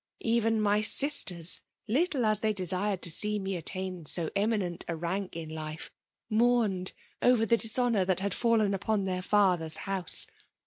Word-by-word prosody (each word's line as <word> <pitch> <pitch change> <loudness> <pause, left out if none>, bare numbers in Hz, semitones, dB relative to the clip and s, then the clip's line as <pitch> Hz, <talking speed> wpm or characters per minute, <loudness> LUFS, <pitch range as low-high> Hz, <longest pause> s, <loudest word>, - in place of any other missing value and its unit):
Even 225 -1 +1
my 210 0 +1
sisters, 210 - +2 0.3
little 275 - 0
as 215 -1 +5
they 215 0 0
desired 190 0 -2
to 170 - +2
see 210 +6 +3
me 195 -1 -4
attain 185 -1 -4
so 165 0 +2
eminent 200 -4 -1
a 170 - -3
rank 175 +2 -4
in 165 -1 -6
life, 155 0 -7 0.4
mourned 220 -5 +1 0.3
over 245 -3 +3
the 235 - +3
dishonour 230 -2 +2
that 185 -1 0
had 200 0 -2
fallen 225 -4 +1
upon 200 +1 -1
their 185 -1 -2
father 185 -4 +2
s 160 - +5
house. 195 -3 -3
200 Hz, 165 wpm, -28 LUFS, 180-220 Hz, 0.4 s, as